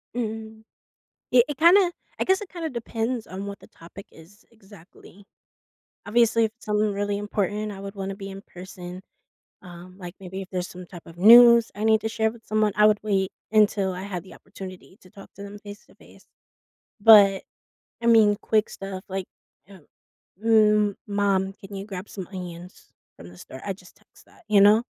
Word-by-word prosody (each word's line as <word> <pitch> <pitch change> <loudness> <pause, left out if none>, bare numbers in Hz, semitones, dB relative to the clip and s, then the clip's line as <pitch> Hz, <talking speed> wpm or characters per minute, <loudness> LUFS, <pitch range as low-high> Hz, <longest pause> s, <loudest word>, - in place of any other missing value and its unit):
Mhm. 220 -1 -5 0.7
It 245 -1 +5
it 290 - -4
kinda 350 +3 +5 0.3
I - - +1
guess 380 +1 +1
it 410 - -8
kinda 335 -3 -5
depends 235 -1 -4
on 190 +2 -7
what 200 0 -7
the - - -17
topic 190 +5 -14
is 185 +8 -18
exactly. 200 -2 -18 0.8
Obviously, 230 +1 +3
if 220 - -4
it's - - -18
something 210 -1 0
really 205 0 -2
important, 210 +1 -3
I 195 - -9
would 200 +1 -8
wanna 195 0 -5
be 195 0 -8
in 195 0 -9
person. 180 0 -10 0.6
Um, 180 0 -13
like, 175 -1 -9
maybe 190 0 -7
if 190 - -11
there's 180 -1 -3
some 180 0 -11
type 175 -2 -13
of 165 - -13
news 235 +3 +8
I 210 - -5
need 220 -1 +4
to 220 - -3
share 220 -1 0
with 230 -1 -17
someone, 215 -1 +1
I 210 - +4
would 210 -1 +3
wait 195 -3 0 0.2
until 205 -3 +3
I 180 - -7
had 190 -3 -6
the - - -14
opportunity 185 0 -12
to 185 - -18
talk 195 - -15
to 200 - -11
them 200 +1 -9
face 205 +1 -11
to - - -22
face. - - -20 0.7
But, 200 -3 +7 0.6
I 235 - -1
mean, 220 -3 +5
quick 215 -1 +1
stuff, 195 -1 -8
like, 190 -1 -4 0.4
eh, 195 -2 -15 0.6
"Mm, 210 -2 +3
mom, 200 -2 0
can 195 0 -12
you 195 +1 -6
grab 195 -1 -8
some 190 -4 -8
onions 180 -2 -10 0.2
from 85 - -13
the 90 - -16
store?" 130 +8 -11
I 195 - -2
just 180 -2 -18
text - - -24
that, 360 - -23
you 205 -2 +4
know? 210 +3 +6
205 Hz, 190 wpm, -24 LUFS, 190-220 Hz, 0.8 s, news